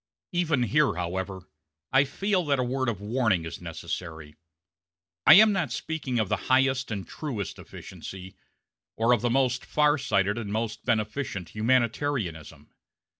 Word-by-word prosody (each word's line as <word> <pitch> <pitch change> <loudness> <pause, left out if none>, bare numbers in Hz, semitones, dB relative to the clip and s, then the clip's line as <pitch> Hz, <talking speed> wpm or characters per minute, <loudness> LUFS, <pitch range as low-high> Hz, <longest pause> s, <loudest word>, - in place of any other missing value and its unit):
Even 165 -7 +1
here, 145 - +2
however, 95 +2 -4 0.5
I 135 +1 +5
feel 190 +6 0
that 140 -2 +2
a 130 - +1
word 130 0 -1
of 105 -5 -3
warning 110 -5 +1
is 80 - -7
necessary. 80 -4 -6 0.9
I - - +11
am 215 +2 +8
not 180 - -1
speaking 145 -3 -3
of 110 -3 +1
the - - 0
highest 130 0 +3
and 100 -4 -4
truest 120 - -5
efficiency, 95 0 -10 0.6
or 115 +2 +3
of 120 - +1
the 120 - +1
most 125 0 +1
far 150 0 +2
sighted 100 -2 +1
and 105 -3 -5
most 110 0 -3
beneficent 110 - -2
humanitarianism. 110 - -1
120 Hz, 145 wpm, -27 LUFS, 100-140 Hz, 0.9 s, I